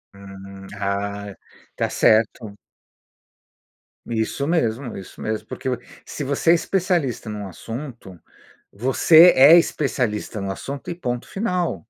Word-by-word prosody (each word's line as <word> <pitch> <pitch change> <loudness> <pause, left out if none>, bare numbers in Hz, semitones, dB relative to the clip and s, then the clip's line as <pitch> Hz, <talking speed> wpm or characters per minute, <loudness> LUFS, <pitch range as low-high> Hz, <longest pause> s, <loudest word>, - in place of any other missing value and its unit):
Uhum. 95 0 -12
Ah. 100 0 -3 0.4
Tá - - -1
certo. 110 -1 +2 1.5
Isso 115 +4 -2
mesmo, 130 -6 -1
isso 95 - -11
mesmo, 110 0 -4
porque - - -5
vo 125 - -1 0.3
se 145 - -6
você 140 +4 +2
é - - +7
especialista 170 - -1
em 105 - -5
um 105 -1 -6
assunto, 115 - -9 0.5
você 155 - +6
é 140 +6 +8
especialista 125 -10 -1
no 100 0 -3
assunto 135 +7 -7
e - - -5
ponto 125 -8 -4
final. 180 -4 -2
120 Hz, 125 wpm, -22 LUFS, 100-150 Hz, 1.5 s, é